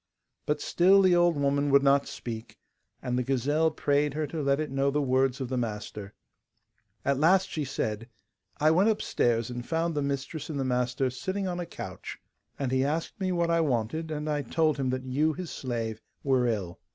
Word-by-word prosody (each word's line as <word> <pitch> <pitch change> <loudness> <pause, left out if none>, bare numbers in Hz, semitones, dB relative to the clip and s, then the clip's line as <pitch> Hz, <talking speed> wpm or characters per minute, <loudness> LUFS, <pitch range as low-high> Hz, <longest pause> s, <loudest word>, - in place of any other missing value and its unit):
But 150 0 +1
still 190 +6 +4
the 185 -2 +5
old 175 -2 +3
woman 140 0 +1
would 140 0 +5
not 140 0 +4
speak, 115 -2 -7 0.5
and 125 -1 0
the - - 0
gazelle 140 +5 +1
prayed 145 -1 0
her 155 0 0
to 155 +2 -4
let 140 0 +2
it 155 -3 -3
know 135 +1 +1
the 145 +2 0
words 130 -1 +1
of 130 - -3
the 130 +1 -2
master. 105 -3 -5 0.9
At 140 -1 +1
last 185 +5 +4
she 155 - -2
said: 115 -4 -3 0.5
'I 155 +1 +4
went 190 +7 +4
upstairs 120 - 0
and 120 0 -5
found 165 +4 -1
the 145 - -1
mistress 140 +3 -3
and 145 -3 -3
the 135 - 0
master 125 +1 0
sitting 190 +9 -3
on 180 -1 -3
a 175 - -4
couch, - - -7 0.4
and 135 -3 -2
he 130 0 +2
asked 155 +8 -2
me 185 -1 0
what 170 -1 +1
I 165 0 +3
wanted, 145 +3 -1
and 150 0 -3
I 150 -1 0
told 155 +3 +1
him 135 -2 -1
that 130 0 -2
you, 150 +5 +1
his 175 +2 -6
slave, 115 -4 -4 0.2
were 130 -3 +2
ill. 100 -7 -2
140 Hz, 200 wpm, -28 LUFS, 125-160 Hz, 0.9 s, the